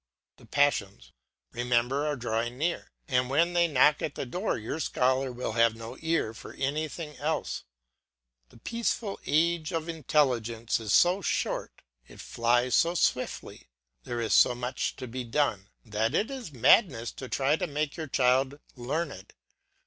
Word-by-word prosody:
The - - -18
passions, 100 - 0 0.4
remember, 125 +4 0
are 150 - 0
drawing 120 -1 -2
near, 170 +4 -2 0.2
and 125 -3 +1
when 170 +6 +2
they 170 -1 +4
knock 150 0 +4
at 150 - -3
the - - -4
door 180 - -2
your 115 +8 -4
scholar 130 -2 +1
will 125 -1 -4
have 115 0 +3
no 115 +2 -8
ear 160 -9 0
for 115 - -11
anything 150 +2 -3
else. 155 +2 -2 0.8
The - - -18
peaceful 230 - -2
age 165 +2 +1
of 165 -1 -2
intelligence 125 -9 0
is 110 -2 -4
so 180 +3 +5
short, - - -2 0.2
it - - -15
flies 120 +1 +1
so 170 +7 +3
swiftly, - - -1 0.4
there 120 - -4
is 115 -2 0
so 125 - +6
much 125 +1 -3
to 130 - -7
be 125 +2 -5
done, 115 -6 -1 0.2
that 110 +1 -1
it 225 +6 0
is 255 - -6
madness 125 - +4
to 130 - -9
try 140 +2 +2
to 170 - -2
make 150 -1 -2
your 160 -2 -5
child 130 +2 +2 0.2
learned. 135 - -4
135 Hz, 155 wpm, -28 LUFS, 120-160 Hz, 0.8 s, so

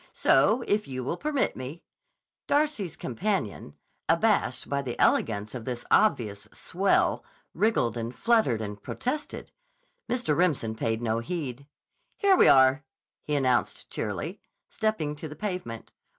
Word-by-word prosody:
So, 240 +3 +3
if 210 +1 0
you 130 -1 -4
will 135 - -2
permit 290 +4 -1
me—" 135 +6 -7 0.6
Darcy's 285 - 0
companion, 125 - -3 0.3
abashed 165 - +2
by 140 0 -1
the 125 -3 -6
elegance 105 -1 +2
of 125 -3 -6
this 120 0 -5
obvious 110 - +2
"swell," - - +1 0.3
wriggled 165 - +1
and 115 0 -3
fluttered 220 - +2
and 105 -1 -6
protested. 270 - -4 0.6
Mr. 240 -11 0
Remsen 150 -10 +1
paid 110 +1 -2
no 115 0 0
heed. 140 0 -5 0.5
"Here 400 -2 +5
we - - +6
are," 130 +1 +6 0.4
he 150 - -2
announced 130 -3 0
cheerily, - - -4 0.3
stepping 190 -9 -1
to 160 - -6
the 150 - -9
pavement. 180 - -5
140 Hz, 135 wpm, -27 LUFS, -, 0.6 s, we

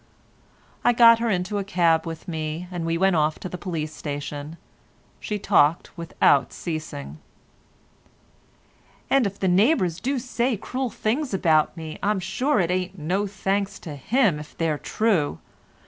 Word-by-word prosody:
I 245 - +4
got 230 -1 +7
her 235 0 0
into 195 +1 -1
a - - -2
cab 170 -4 +2
with 165 -1 -7
me, 160 +1 -4
and 170 -2 -3
we 165 0 0
went 190 +1 +3
off 155 0 +1
to - - -6
the 180 - -7
police 160 -5 -4
station. 145 +1 -6 0.6
She 210 - -3
talked 170 -6 +2
without 165 -5 +2
ceasing. 80 - -6 1.9
"And 270 -5 +4
if 200 0 -7
the 190 - 0
neighbours 185 - +3
do 270 +2 -1
say 245 -1 -1
cruel 255 +5 -3
things 240 +2 -1
about 160 -2 +2
me, 160 -1 -7
I'm 205 0 +1
sure 250 +9 0
it 175 -1 +1
ain't 185 +1 -2
no 185 +6 -1
thanks 195 0 -2
to 155 -3 -6
him 200 - +1
if 150 - -12
they're 160 -3 0
true. 185 - 0
180 Hz, 155 wpm, -24 LUFS, 155-210 Hz, 1.9 s, got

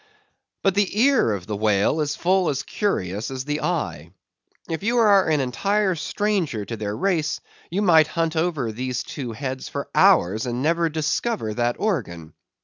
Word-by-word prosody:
But 195 - +3
the 205 +1 0
ear 260 - +4
of 100 -4 -4
the 105 - -4
whale 105 +8 +2
is 145 -1 -1
full 185 0 +2
as 140 -1 -2
curious 105 - -2
as 130 -1 -5
the 150 +1 -2
eye. 145 - -3 0.6
If 160 -1 -3
you 235 +4 0
are 205 -6 +5
an 150 -3 +2
entire 195 +10 0
stranger 175 - -1
to 115 - -5
their 105 -1 -4
race, 170 -5 0 0.3
you 195 +5 -1
might 160 -5 +6
hunt 165 -1 -1
over 160 -8 0
these 125 +2 -3
two 125 -5 -6
heads 130 +2 -5
for - - -5
hours, 105 +7 +4
and 120 +2 -2
never 165 +1 +2
discover 155 - -1
that 120 +1 0
organ. 85 - -3
150 Hz, 170 wpm, -23 LUFS, 115-185 Hz, 0.6 s, might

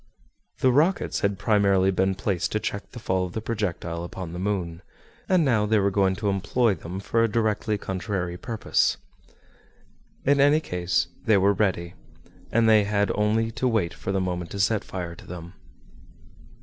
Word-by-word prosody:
The 130 - +5
rockets 160 +9 +2
had 100 -1 0
primarily 100 -2 +3
been 95 +1 +1
placed 95 -2 -1
to 110 - +1
check 100 -2 -4
the - - -12
fall 95 -5 -1
of 90 -1 -5
the - - -2
projectile 90 -7 -3
upon 85 -1 -7
the 90 - -5
moon, 90 -4 -2 0.5
and 180 -4 +4
now 110 -6 +2
they 110 +1 +3
were 100 -1 +2
going 95 -1 +2
to 105 +1 -1
employ 105 +4 +1
them 90 +2 -7
for 115 +3 +1
a - - +4
directly 110 -1 0
contrary 95 -2 -3
purpose. 115 +4 0 1.3
In 140 0 +4
any 145 +2 +5
case 90 - -1 0.2
they 110 -2 +5
were 100 +1 +4
ready, 90 -4 -1 0.6
and 115 0 +3
they 110 -1 +6
had 105 0 +1
only 110 +2 +1
to 115 +3 -1
wait 110 -9 0
for 95 - -5
the 95 - 0
moment 90 -2 -3
to 100 - -6
set 110 +1 +2
fire 90 -2 -5
to - - -14
them. 85 0 -8
100 Hz, 175 wpm, -25 LUFS, 90-110 Hz, 1.3 s, they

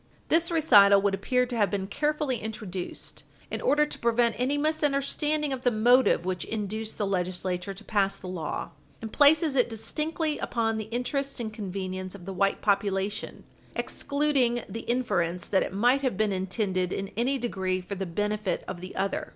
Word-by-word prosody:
This 335 +1 +3
recital 205 - +6
would 200 -1 +2
appear 250 +6 +1
to 245 -1 -5
have 210 -3 +2
been 195 -2 -2
carefully 295 +3 -1
introduced 210 -5 -6 0.3
in - - -3
order 300 +1 +3
to 300 - -7
prevent 235 0 +2
any 265 +4 +1
misunderstanding 295 0 0
of 260 - -4
the 250 - +3
motive 240 -4 +4
which 185 -2 -2
induced 215 0 -4
the 205 - 0
Legislature 185 0 -2
to 205 - -11
pass 195 -2 +1
the - - -12
law, 180 -4 -4 0.3
and 220 -2 -7
places 300 0 +5
it 250 -2 +3
distinctly 305 +7 -2
upon 225 -2 -1
the 215 - -3
interest 260 +5 -2
and 220 -2 -4
convenience 185 -2 -5
of 180 -3 -11
the 195 - -5
white 195 +1 +1
population 200 0 0 0.3
excluding 280 -5 0
the 230 - -7
inference 180 -8 0
that 190 - +2
it - - -2
might 245 +8 +3
have 255 -8 -1
been 215 0 +2
intended 190 -1 -1
in 195 0 -3
any 255 +4 +1
degree 190 -7 -1
for 185 +2 -7
the 195 -1 -3
benefit 210 +3 -1
of 180 -2 -6
the 185 - -8
other. 195 +1 -2
215 Hz, 175 wpm, -27 LUFS, 195-260 Hz, 0.3 s, recital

